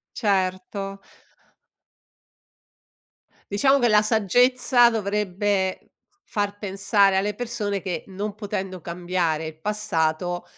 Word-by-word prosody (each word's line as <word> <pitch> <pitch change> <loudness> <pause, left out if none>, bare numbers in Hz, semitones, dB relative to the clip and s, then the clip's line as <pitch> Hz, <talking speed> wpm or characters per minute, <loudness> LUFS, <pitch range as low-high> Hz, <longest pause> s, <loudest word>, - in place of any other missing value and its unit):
Certo. 195 -1 -1 2.5
Diciamo, 270 +7 +4
che 240 -3 +3
la 210 0 +5
saggezza 245 +3 +4
dovrebbe 200 -2 -1 0.3
f 410 - -32
far 205 -1 -2
pensare 195 0 +2
alle 205 +2 +1
persone 210 -3 -3
che 175 -4 -4
non 200 +2 -4
potendo 190 -4 -5
cambiare 170 -2 -2
il 155 0 -8
passato, 175 -3 -1
200 Hz, 95 wpm, -24 LUFS, 185-210 Hz, 2.5 s, la